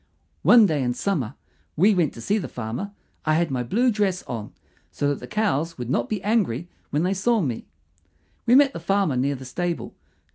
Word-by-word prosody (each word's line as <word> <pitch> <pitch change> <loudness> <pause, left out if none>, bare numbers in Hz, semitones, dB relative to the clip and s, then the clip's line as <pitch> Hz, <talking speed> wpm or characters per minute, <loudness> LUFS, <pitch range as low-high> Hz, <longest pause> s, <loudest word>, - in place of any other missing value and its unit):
One 235 -3 +7
day 155 -7 +1
in 125 -1 0
summer 140 - -1 0.4
we 200 +7 +5
went 170 -6 +2
to 115 - -8
see 205 - +1
the 185 - -4
farmer. 120 - -5 0.3
I 155 0 +2
had 165 -2 +1
my 130 -2 0
blue 235 - +2
dress 200 -4 0
on, 110 -4 -6 0.4
so 145 - 0
that 145 - -1
the - - -9
cows 165 -7 0
would 125 -1 -4
not 120 -3 0
be 210 -3 -2
angry 190 - +1 0.2
when 150 +3 0
they 185 +2 +1
saw 225 +4 +2
me. 130 - -3 0.8
We 240 - +6
met 275 0 +6
the - - -5
farmer 195 -3 +1
near 135 +3 +1
the 130 0 -9
stable. 170 +7 -3
165 Hz, 205 wpm, -24 LUFS, 130-205 Hz, 0.8 s, One